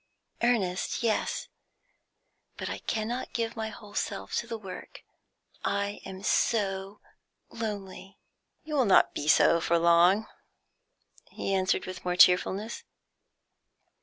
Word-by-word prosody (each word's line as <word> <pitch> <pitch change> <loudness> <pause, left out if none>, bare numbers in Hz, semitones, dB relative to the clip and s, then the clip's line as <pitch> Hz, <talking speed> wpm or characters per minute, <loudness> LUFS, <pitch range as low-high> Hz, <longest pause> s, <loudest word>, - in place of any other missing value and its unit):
"Earnest? 215 -5 0
Yes. 225 -2 0 1.1
But - - -4
I - - -5
cannot 230 +3 -3
give 230 -1 -2
my 220 -1 -3
whole 210 -1 -12
self 95 0 -3
to 235 - -2
the 230 - -4
work. 190 -4 -10 0.6
I 200 0 -1
am 190 0 -9
so 195 -2 0 0.5
lonely." 200 -3 -6 0.5
"You 310 - -7
will 270 -4 +3
not 195 - +5
be 145 - -4
so 155 +2 +5
for 170 +1 +2
long," 170 +5 +4 1.0
he 195 - -3
answered 185 -1 +1
with 185 0 -7
more 180 0 -1
cheerfulness. 190 +5 +3
200 Hz, 120 wpm, -28 LUFS, 185-225 Hz, 1.1 s, not